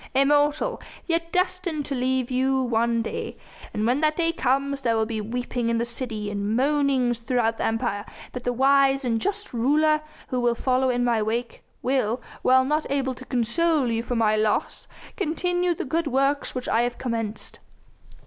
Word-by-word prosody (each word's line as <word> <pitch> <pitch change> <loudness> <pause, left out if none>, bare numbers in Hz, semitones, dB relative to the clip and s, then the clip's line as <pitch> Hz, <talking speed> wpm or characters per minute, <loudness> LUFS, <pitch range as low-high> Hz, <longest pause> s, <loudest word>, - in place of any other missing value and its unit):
"Immortal, 295 - +2 0.2
yet 335 -1 -1
destined 365 -4 -1
to 280 - -3
leave 255 -1 0
you 265 +1 +2
one 235 -1 +1
day. - - -5 0.3
When 240 +7 0
that 310 0 +2
day 330 -1 +1
comes, 275 -1 0
there 230 -3 +1
will 220 0 +2
be 220 -1 -3
weeping 240 +2 -2
in 230 - +1
the 235 - 0
city 230 -4 -4
and 205 +1 -1
moanings 265 -3 +2
throughout 230 -1 0
the - - 0
Empire, 215 -2 -1 0.3
but 250 - -6
the 245 - 0
wise 270 +1 +3
and 230 -2 0
just 410 -2 -3
ruler 305 +6 +3 0.3
who 255 - -1
will 240 -1 +2
follow 260 +1 +1
in 245 -1 +1
my 235 -2 +2
wake 230 +3 -2 0.2
will 250 -2 +1 0.2
while 260 0 +4
not 300 +3 0
able 270 -1 0
to 260 +1 -11
console 260 +3 +1
you 225 0 0
for 245 +1 -3
my 215 -2 +3
loss 215 0 0 0.3
continue 355 -1 0
the - - -4
good 325 +4 -1
works 275 +1 +1
which 250 - -4
I 230 - +2
have 240 0 -1
commenced. 225 -4 -4
255 Hz, 175 wpm, -25 LUFS, 235-290 Hz, 0.3 s, while